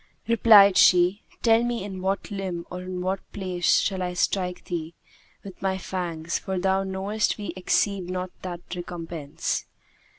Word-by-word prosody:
Replied 210 -4 +7
she, 180 +3 +5 0.2
'Tell 225 -1 +5
me 240 -4 -2
in 190 -2 -6
what 195 +3 -2
limb 185 -4 -4
or 180 0 -5
in 185 0 -5
what 190 +2 -1
place 185 -3 +1
shall 190 -2 -1
I 180 0 -3
strike 180 0 -1
thee 165 -2 -4 0.5
with 195 -2 -11
my 190 -1 0
fangs, 170 -3 -3
for 190 -1 -4
thou 190 +1 +2
knowest 195 +3 -1
we 210 - -5
exceed 185 0 0
not 185 0 -3
that 175 -2 -6
recompense.' 170 -4 -4
185 Hz, 155 wpm, -25 LUFS, 180-195 Hz, 0.5 s, Replied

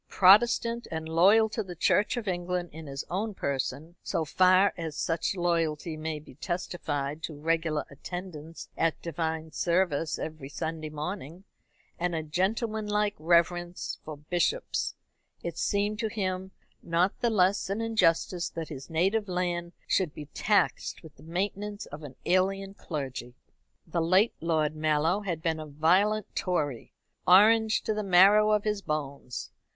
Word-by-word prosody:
Protestant, 230 +4 +5
and 160 -1 -4
loyal 195 +7 +5
to 220 - -2
the 185 -4 -7
Church 205 +8 +2
of 225 -3 -4
England 175 -1 -2
in 160 0 -9
his 135 0 -5
own 205 +3 -2
person 140 +4 -3
so 160 - -1
far 185 +5 +4
as 160 -3 -5
such 165 +3 -1
loyalty 165 -3 0
may 155 0 -3
be 150 - -13
testified 150 -2 -3
by - - -8
regular 160 0 0
attendance 165 +1 -8
at 165 - +1
divine 160 -1 -3
service 170 -2 +1
every 155 -4 -6
Sunday 160 +1 -4
morning, 160 +2 -6 0.6
and 175 0 0
a 160 - -2
gentlemanlike 210 +4 0
reverence 175 +2 +1
for 155 -1 -7
bishops 175 - -1 0.5
it - - -4
seemed 205 +1 0
to 225 - 0
him 190 -3 -3 0.3
not 170 +3 +1
the 240 - +2
less 195 -2 +2
an 200 +3 -1
injustice 185 -5 +1
that 165 -1 -6
his 135 -3 -8
native 195 +6 +1
land 175 -1 -1
should 180 -6 0
be 150 - -7
taxed 205 -3 +1
with 160 - -13
the - - -18
maintenance 200 +5 -3
of 145 +2 -9
an 140 -4 -9
alien 195 +2 +1
clergy. 135 -9 -6 0.5
The 170 0 -1
late 185 +7 +4
Lord 155 -2 +1
Mallow 155 +4 +2
had 170 -6 -4
been 160 -1 0
a 155 - -6
violent 185 +9 +2
Tory, 145 -9 -1 0.4
Orange 220 +4 +6
to 220 - 0
the 215 - -2
marrow 200 +3 +6
of 210 -1 +3
his 210 -1 -1
bones. 140 -6 -4
175 Hz, 150 wpm, -28 LUFS, 155-195 Hz, 0.6 s, Orange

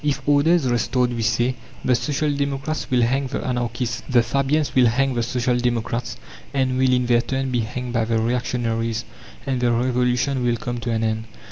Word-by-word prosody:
If 140 -2 -1
"order 145 +3 +4
is 165 -7 +2
restored," 125 +1 +1
we 120 - -3
say, 120 +3 +1 0.3
the 130 - +3
social 145 +3 0
democrats 140 +2 -2
will 125 -3 +3
hang 135 +3 +1
the 130 - -4
anarchists; 120 -1 -2
the 120 -3 +4
Fabians 140 +5 0
will 125 -2 +5
hang 135 +3 +1
the 120 - 0
social 125 +1 0
democrats, 120 -1 -2 0.4
and 130 -2 +1
will 130 -1 +3
in 125 -1 +2
their 120 -1 +3
turn 135 +1 -2
be 125 - +1
hanged 120 +2 -4
by 115 -2 +1
the 115 0 0
reactionaries; 115 -1 -1 0.4
and 130 -3 -1
the 120 -1 +3
Revolution 125 +2 +1
will 120 -1 +1
come 120 +1 -4
to 120 - -4
an 115 -1 0
end. 110 0 -1
125 Hz, 200 wpm, -22 LUFS, 120-135 Hz, 0.4 s, will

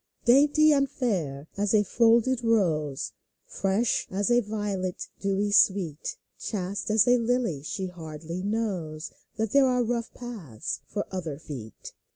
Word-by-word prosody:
Dainty 290 +5 +6
and 275 -1 +2
fair 160 - -2
as 205 +1 +2
a 210 - +5
folded 235 +4 +3
rose. 160 -11 +1 0.3
Fresh 195 +4 0
as 200 +4 0
a 240 - +6
violet 205 -4 -3
dewy 200 +1 0
sweet. 190 -7 +2 0.2
Chaste 200 -1 -3
as 215 +2 +4
a 245 0 +5
lily, 230 - 0
she 190 +6 -4
hardly 165 -1 -7
knows 185 -7 -3 0.2
That 220 -2 -1
there 280 -1 +5
are 250 -1 +2
rough 235 0 -2
paths 160 - -6
for 205 +4 -3
other 165 -6 -4
feet. 130 -8 -9
205 Hz, 140 wpm, -27 LUFS, 165-235 Hz, 0.3 s, Dainty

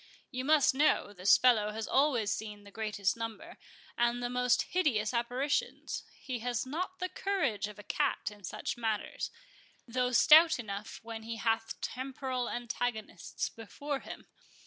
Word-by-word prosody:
You 255 0 -3
must 300 -2 +5
know, 270 -7 +2
this 185 0 +5
fellow 225 -5 +4
has 220 0 -4
always 260 -7 +2
seen 210 -1 -4
the 200 - -14
greatest 205 -3 -1
number, 230 +9 -6 0.4
and 240 0 +2
the 245 - -2
most 250 0 +3
hideous 250 -12 +1
apparitions; 245 +5 -1 0.2
he 255 -3 -4
has 245 +1 -1
not 360 +7 -3
the 365 - -2
courage 355 - -1
of 210 0 -10
a 205 - -10
cat - - 0
in 205 -1 -15
such 180 - -4
matters, 220 -3 -2 0.6
though 250 +1 0
stout 315 +6 +7
enough 210 -3 -6
when 225 -1 -6
he 225 +1 -5
hath 225 0 -1
temporal 260 -1 -3
antagonists 240 -2 -3
before 275 +6 -5
him. - - -9
240 Hz, 150 wpm, -32 LUFS, 220-265 Hz, 0.6 s, stout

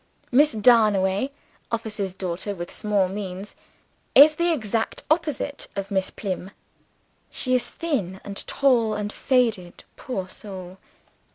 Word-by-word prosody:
Miss 290 +3 +5
Darnaway 210 -1 +4 0.4
(officer's 210 -5 -3
daughter 190 +2 -3
with 175 -1 -7
small 205 -3 +1
means) 195 0 -6 0.6
is 295 +3 +9
the 340 +2 +1
exact 225 -6 -2
opposite 300 -3 0
of 195 0 -4
Miss 190 -1 0
Plym. 190 -2 -4 0.8
She 255 - -1
is 250 - +2
thin 220 - -2
and 200 -1 -7
tall 235 -6 +2
and 210 0 -3
faded 230 -9 0
poor 195 -8 -4
soul. 185 -1 -9
210 Hz, 120 wpm, -24 LUFS, 190-255 Hz, 0.8 s, is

